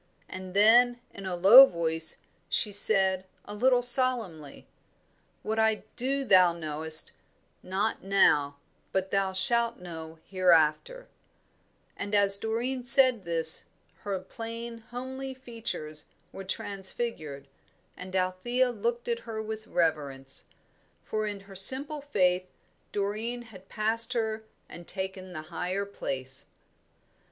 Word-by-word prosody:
And 185 0 -9
then, 240 +4 +5
in 195 -1 -8
a 180 - -3
low 220 +10 +9
voice, 160 -3 -1 0.3
she 210 - +3
said, 190 -2 +2 0.2
a - - -8
little 245 +3 +2
solemnly, 240 - +1 0.8
"'What 220 +1 -2
I 220 -1 +1
do 270 +2 -1
thou 185 -5 +5
knowest 155 -1 -1 0.5
not 195 +4 -3
now, 145 -7 +2 0.3
but 190 0 -2
thou 195 -1 0
shalt 235 +5 +2
know 165 -2 -10
hereafter;'" 185 - +1 0.9
and 205 +1 -3
as 200 -1 +5
Doreen 240 +4 -3
said 250 -4 +5
this 165 -1 +4 0.3
her 200 -2 -4
plain, 230 +4 -8
homely 260 +3 -7
features 230 - -7 0.3
were 195 - -9
transfigured 190 - -5 0.5
and 185 +1 -9
Althea 215 +8 0
looked 235 +2 -3
at 235 -1 -1
her 230 -2 -7
with 220 0 -7
reverence; 140 -5 -2 0.6
for 215 0 -3
in 205 -1 -6
her 195 0 -15
simple 275 +9 +4
faith 185 -9 0 0.4
Doreen 215 +4 -3
had 190 -5 -15
passed 225 +3 +2
her 220 -2 -2 0.3
and 170 0 -12
taken 190 -1 -5
the 155 -3 -7
higher 190 +3 -3
place. 135 -9 -7
200 Hz, 120 wpm, -27 LUFS, 180-235 Hz, 0.9 s, low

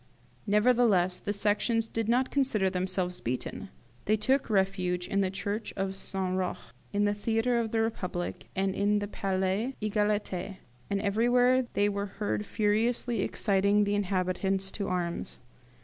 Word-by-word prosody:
"Nevertheless 210 -4 +3
the 205 - -3
Sections 210 +3 +1
did 225 -1 -2
not 250 +2 +2
consider 220 -9 +1
themselves 180 -1 -2
beaten: 125 +2 -4 0.4
they 215 +1 +3
took 260 +6 +1
refuge 190 -3 0
in 200 - +1
the 190 - +1
church 205 +3 -3
of 195 0 -2
St. 190 -1 -1
Roch, 185 -1 -1 0.3
in 205 0 +1
the 205 - +2
theatre 225 +3 +1
of 230 -1 -1
the 225 0 +1
Republic, 180 -6 -3
and 195 0 0
in 205 +1 +2
the 205 0 -2
Palais 195 +5 -1
Egalite; 205 -3 -1 0.3
and 200 - 0
everywhere 245 +4 +3
they 205 - +3
were 200 0 -2
heard 205 +1 -3
furiously 225 +1 +1
exciting 200 +1 +2
the 205 0 0
inhabitants 190 0 0
to 200 - -4
arms. 175 -2 -3
205 Hz, 150 wpm, -29 LUFS, 190-220 Hz, 0.4 s, Nevertheless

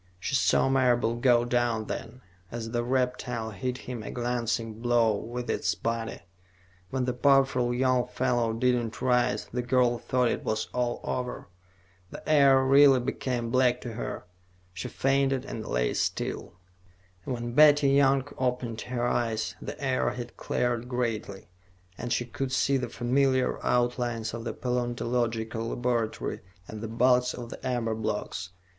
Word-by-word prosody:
She 100 - -4
saw 135 - +3
Marable 125 -3 +2
go 120 -1 +4
down, 120 -2 0
then, 115 +4 -6 0.3
as 115 -1 -5
the 120 0 0
reptile 125 -2 -1
hit 125 +6 -3
him 125 -3 -6
a - - -7
glancing 120 -2 -2
blow 120 -3 +3
with 120 +4 -5
its - - 0
body. 115 -1 -3 0.7
When 130 -1 -1
the 125 - -1
powerful 135 -1 +3
young 125 0 +2
fellow 120 -3 0
did 125 +3 +2
not 120 -2 -3
rise, 125 -1 +1
the 125 - 0
girl 125 -1 +2
thought 125 0 +1
it - - -3
was 110 0 -2
all 120 -1 -1
over. 125 -4 -4 0.6
The - - -10
air 140 -3 +5
really 135 0 +6
became 125 -2 -2
black 125 -1 +3
to 120 - -6
her; 110 - -5 0.5
she 90 - -5
fainted 135 -1 +1
and 110 -4 -6
lay - - 0
still. - - -2 0.7
When 120 -2 -4
Betty 145 0 +6
Young 135 -1 +3
opened 125 -3 -1
her 120 -1 -2
eyes, 115 -2 -1
the - - -7
air 130 -2 +1
had 120 -1 -7
cleared 120 0 -1
greatly, 115 -6 -3 0.5
and 120 +5 -5
she 120 -1 +1
could 130 +2 -4
see 135 +1 +2
the 125 -2 -3
familiar 130 +2 +1
outlines 120 -2 0
of 115 0 -6
the - - -3
paleontological 120 -2 -2
laboratory 120 -3 -1 0.3
and 110 -1 -8
the 115 - -4
bulks 125 +2 +2
of 120 -1 -8
the - - -9
amber 120 -3 -1
blocks. 105 -4 -3
120 Hz, 150 wpm, -28 LUFS, 115-130 Hz, 0.7 s, really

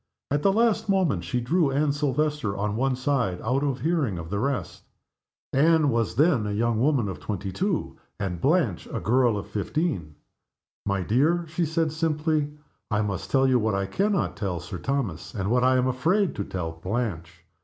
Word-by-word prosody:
At 145 0 +1
the 195 - +4
last 225 0 +2
moment 180 - +2
she 105 +9 -1
drew 155 +5 +2
Anne 140 +2 +1
Silvester 145 -6 -1
on 105 +1 -1
one 130 +2 +1
side, 125 -8 0
out 125 +5 +1
of 140 -4 -1
hearing 145 - 0
of 85 0 -7
the 100 - -1
rest. 135 +3 -2 0.7
Anne 155 +1 +4
was 115 -6 0
then 140 -6 +3
a - - -2
young 115 +1 +1
woman 135 -5 +2
of 95 - -5
twenty 100 -2 -4
two, 190 - -2 0.2
and 90 -4 -3
Blanche 140 - +1
a - - -2
girl 120 -1 +2
of 100 - -4
fifteen. 105 - -2 0.7
"My 100 -2 0
dear," 155 - +2
she 165 +2 -1
said, 160 0 0
simply, 155 -1 0 0.4
"I 105 0 +1
must 100 -2 -3
tell 135 -1 +3
you 130 -1 +4
what 110 -2 0
I 100 0 0
can 200 - 0
not 175 - 0
tell 95 -4 -2
Sir 90 0 -7
Thomas, 120 - -3
and 100 0 -1
what 125 0 +3
I 130 0 +4
am 125 - +2
afraid 165 +10 +1
to 100 - -3
tell 85 -3 -4
Blanche. 90 -2 -4
125 Hz, 190 wpm, -26 LUFS, 100-155 Hz, 0.7 s, the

